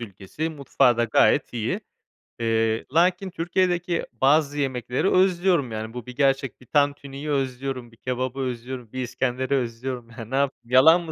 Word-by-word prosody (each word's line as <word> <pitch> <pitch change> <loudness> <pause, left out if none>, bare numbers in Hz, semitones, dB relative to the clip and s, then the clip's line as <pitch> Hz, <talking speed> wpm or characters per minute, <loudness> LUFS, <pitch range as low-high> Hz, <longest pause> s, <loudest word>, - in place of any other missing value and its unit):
ülkesi, 105 - -5
mutfağı 135 -4 +2
da 120 - +2
gayet 115 +4 +3
iyi. 115 -3 -2 0.6
Eee, 115 -1 +1
lakin 180 +3 +3
Türkiye'deki 175 0 0
bazı 145 +4 +2
yemekleri 130 - -1
özlüyorum 180 -8 +3
yani 110 +1 -5
bu 125 -1 -7
bir 125 -1 -9
gerçek. 135 -2 +1
Bir - - -15
tantuniyi 145 +1 -1
özlüyorum, 130 -3 -2
bir 115 - -20
kebabı 130 +1 -3
özlüyorum, 125 -2 -5
bir 130 0 -4
iskenderi 130 +2 -2
özlüyorum. 120 -1 -3
Ya, 115 - -16
ne 130 +5 -4
yapayım, 140 0 +2 0.2
yalan 160 +7 +7
mı 165 -2 -7
130 Hz, 155 wpm, -24 LUFS, 120-145 Hz, 0.6 s, yalan